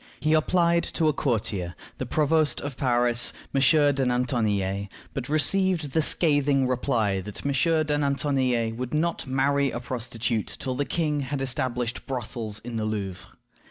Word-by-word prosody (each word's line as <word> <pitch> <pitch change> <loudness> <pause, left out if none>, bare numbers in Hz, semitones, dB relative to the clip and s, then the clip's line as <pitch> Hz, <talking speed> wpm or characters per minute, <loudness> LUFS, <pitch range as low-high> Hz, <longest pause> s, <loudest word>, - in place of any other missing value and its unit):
He 155 +1 +1
applied 170 +2 +3
to 160 -2 +3
a - - +1
courtier, 105 -10 -1 0.2
the - - -3
Provost 155 0 +2
of 145 -2 -5
Paris, 120 -2 +2 0.2
M. 135 - +2 0.3
de 135 0 0
Nantonillet, 110 -6 0 0.3
but 135 -1 -4
received 170 0 +2
the 160 - +2
scathing 145 -4 +3
reply 115 -6 0
that 105 +6 -8
"M. 140 - +1 0.3
de 150 -1 0
Nantonillet 130 -5 +1
would 125 +3 -3
not 165 -1 -1
marry 140 +1 +2
a 120 - -4
prostitute 120 -2 -3
till 130 - -2
the 140 +3 -1
king 150 -3 0
had 140 0 -3
established 125 -2 -2
brothels 115 -4 -4
in 120 -2 -5
the 110 - -1
Louvre." 95 -3 -4
130 Hz, 155 wpm, -26 LUFS, 115-145 Hz, 0.3 s, applied